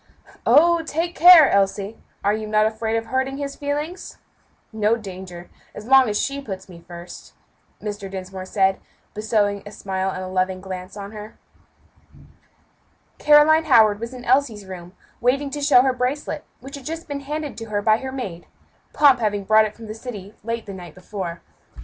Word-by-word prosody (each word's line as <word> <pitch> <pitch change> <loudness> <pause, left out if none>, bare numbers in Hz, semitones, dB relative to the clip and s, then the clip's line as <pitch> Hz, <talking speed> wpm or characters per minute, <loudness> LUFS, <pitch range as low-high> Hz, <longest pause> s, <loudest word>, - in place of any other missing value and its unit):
"Oh! 340 +2 +5
take 330 +2 -3
care, 340 -3 +9
Elsie; 200 +2 0 0.3
are 205 +1 +2
you 215 0 -4
not 215 0 +3
afraid 220 +1 -1
of 225 - -3
hurting 265 +2 -2
his 280 -1 -5
feelings?" 295 +5 -4 0.6
"No 220 +1 +2
danger, 185 -5 -9 0.3
as 210 - -8
long 265 -1 +5
as 210 - -1
she 280 0 -2
puts 190 -7 -7
me 170 -3 -14
first," 175 0 -11 0.5
Mr. 205 -2 -6
Dinsmore 190 0 -7
said, 190 -1 +1 0.3
bestowing 210 -2 0
a 205 - -10
smile 190 -2 -3
and 185 0 -5
loving 185 0 0
glance 185 +1 -8
on 200 0 -7
her. 215 0 -10 1.8
Caroline 300 +2 +5
Howard 220 -7 +5
was 230 +2 -5
in 250 -1 -10
Elsie's 245 -6 +1
room, 180 -1 -10 0.3
waiting 275 +3 +1
to 290 - -4
show 275 -4 +5
her 260 -1 +2
bracelet, 255 +4 -3 0.2
which 270 +3 -9
had 270 - -13
just 330 +1 -6
been 285 -1 -4
handed 295 0 -5
to 225 - -6
her 205 -2 -3
by 215 0 +4
her 260 +2 -6
maid; 195 -11 -6 0.5
Pomp 275 -4 +5
having 205 -3 -1
brought 215 +2 +5
it 215 - -6
from 230 - -11
the 215 - -6
city 215 -4 -9
late 230 0 -4
the 200 - -8
night 175 -4 -10
before. 185 -2 -6
220 Hz, 175 wpm, -22 LUFS, 195-270 Hz, 1.8 s, care